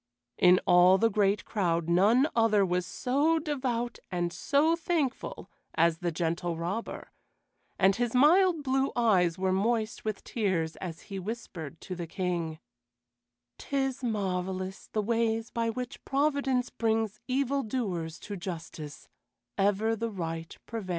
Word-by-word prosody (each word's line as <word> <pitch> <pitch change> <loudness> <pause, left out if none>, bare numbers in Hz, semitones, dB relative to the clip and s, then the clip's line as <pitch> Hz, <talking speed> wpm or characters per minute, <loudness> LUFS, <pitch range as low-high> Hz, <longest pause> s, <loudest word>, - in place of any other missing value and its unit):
In 180 0 +6
all 180 +2 +6
the 225 +3 +2
great 200 0 +2
crowd, 170 -6 0
none 210 - +4
other 220 -3 +4
was 180 -1 -1
so 290 +6 +1
devout 255 -6 -2
and 175 -1 -2
so 305 +4 +2
thankful 330 -6 -2 0.3
as 165 0 +3
the 175 -1 -1
Gentle 170 +1 -2
Robber, 180 +8 -4 0.7
and 195 0 +4
his 240 0 -1
mild 330 +4 +5
blue 270 0 +1
eyes 185 -8 +3
were 190 0 0
moist 220 +3 0
with 215 -2 -3
tears 185 -8 -1
as 170 -3 -6
he 195 -1 -6
whispered 180 -7 -6
to 185 - -6
the 170 -1 -5
King: 170 -3 -2 1.0
"'Tis 270 -2 -2
marvelous, 190 -3 -2
the 215 - 0
ways 225 0 0
by 230 -1 0
which 250 +1 -5
Providence 275 -3 +1
brings 220 -2 0
evil 275 +1 +1
doers 185 -9 -3
to 205 - -6
justice; 165 -4 -7 0.5
ever 205 +3 +2
the 230 +1 -2
right 165 -5 -5
prevails." 225 -5 -6
210 Hz, 135 wpm, -29 LUFS, 180-245 Hz, 1.0 s, In